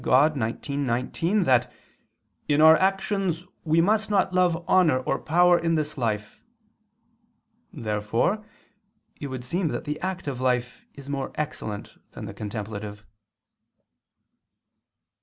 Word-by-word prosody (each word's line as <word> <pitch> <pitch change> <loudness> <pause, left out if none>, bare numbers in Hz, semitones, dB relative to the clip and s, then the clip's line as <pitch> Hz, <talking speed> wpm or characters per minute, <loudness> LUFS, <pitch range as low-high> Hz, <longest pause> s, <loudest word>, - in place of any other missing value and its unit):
Dei 140 +4 +5 0.3
xix, - - -10
19) 145 - 0
that 125 -4 +3 0.8
"in 145 0 +2
our 160 +1 +9
actions 190 -2 0 0.2
we 160 +1 +3
must 215 +4 +2
not 195 -3 +2
love 175 -2 +2
honor 175 -8 +4
or - - -1
power 175 +2 +4
in 165 -1 +1
this 155 -1 -2
life." 110 -5 -3 1.3
Therefore 115 - -1 0.7
it 145 - -5
would 130 -2 -6
seem 170 +8 -1
that - - -3
the 150 0 -4
active 175 -9 -3
life 125 -1 -1
is 140 -1 -11
more 140 -2 -3
excellent 140 -9 -5
than - - -7
the - - -7
contemplative. 105 0 -6
150 Hz, 120 wpm, -25 LUFS, 125-180 Hz, 1.3 s, our